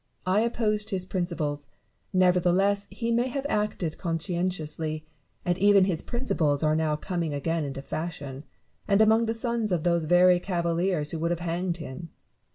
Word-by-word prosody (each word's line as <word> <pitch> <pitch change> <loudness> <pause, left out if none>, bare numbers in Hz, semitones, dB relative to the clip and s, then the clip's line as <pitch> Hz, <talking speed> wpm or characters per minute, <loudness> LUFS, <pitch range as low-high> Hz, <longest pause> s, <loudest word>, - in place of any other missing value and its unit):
I 190 +3 +3
opposed 220 -2 0
his 190 -3 -2
principles; 160 -6 -3 0.4
nevertheless 185 +2 +3
he 230 -1 -3
may 240 +2 +2
have 270 +2 -4
acted 210 - -1
con 165 -2 -1
scientiously; 160 -3 -3 0.4
and 175 +1 0
even 200 -1 +6
his 175 -4 -1
principles 160 - 0
are 155 0 +3
now 155 -1 +1
coming 165 -1 -3
again 165 +3 -1
into 135 -1 -5
fashion, 145 -4 -5 0.4
and 200 0 +3
among 220 +1 +4
the 225 - -1
sons 230 -2 0
of 170 -3 0
those 170 -2 +2
very 175 +2 +5
cavaliers 170 -3 0
who 165 - -4
would 170 +1 0
have 175 0 -2
hanged 175 +1 -2
him. 165 +1 -8
175 Hz, 165 wpm, -27 LUFS, 160-200 Hz, 0.4 s, even